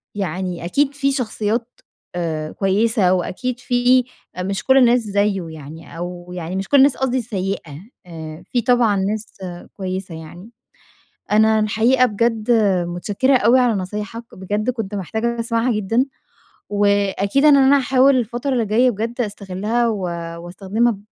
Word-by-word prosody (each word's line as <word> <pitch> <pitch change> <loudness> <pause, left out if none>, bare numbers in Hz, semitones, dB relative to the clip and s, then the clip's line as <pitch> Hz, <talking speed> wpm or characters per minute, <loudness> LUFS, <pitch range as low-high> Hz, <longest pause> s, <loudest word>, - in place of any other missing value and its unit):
يعني 180 -2 -3
أكيد 280 +10 +1
في 275 -1 0
شخصيات 230 -2 -2 0.4
آآ 160 -3 -3
كويسة، 200 0 +2
وأكيد 240 +7 -2
في 250 +1 +3 0.4
مش 195 +2 -3
كل 265 0 +4
الناس 245 -1 +5
زيه 200 -3 0
يعني، 160 +2 -11
أو 175 0 -7
يعني 175 +1 -5
مش 195 0 -3
كل 285 - +5
الناس 275 0 +5
قصدي 260 -1 0
سيئة، 190 -8 -4 0.2
آآ 160 -1 -9
في 245 - +1
طبعًا 240 -3 +3
ناس 205 +3 -2 0.4
كويسة 185 -2 -5
يعني. 175 +6 -11 0.8
أنا 220 +1 +4
الحقيقة 230 +4 +3
بجد 225 0 0 0.4
متشكرة 205 +10 +1
أوي 240 +3 +4
على 245 -3 +3
نصايحك، 210 +4 -5
بجد 205 +5 -2
كنت 220 -5 -3
محتاجة 220 +5 -2
أسمعها 230 +1 0
جدًا، 225 +5 +1 0.6
وأكيد 205 +4 +1
إن 295 -2 +7
أنا 275 +1 +5
هاحاول 265 +1 +4
الفترة 240 +3 -2
اللي 240 -3 +1
جاية 235 +5 +3
بجد 230 +3 -4
أستغلّها 210 +2 -1
و 215 -3 -1 0.5
واستخدمها 205 +5 -1
215 Hz, 140 wpm, -20 LUFS, 190-245 Hz, 0.8 s, إن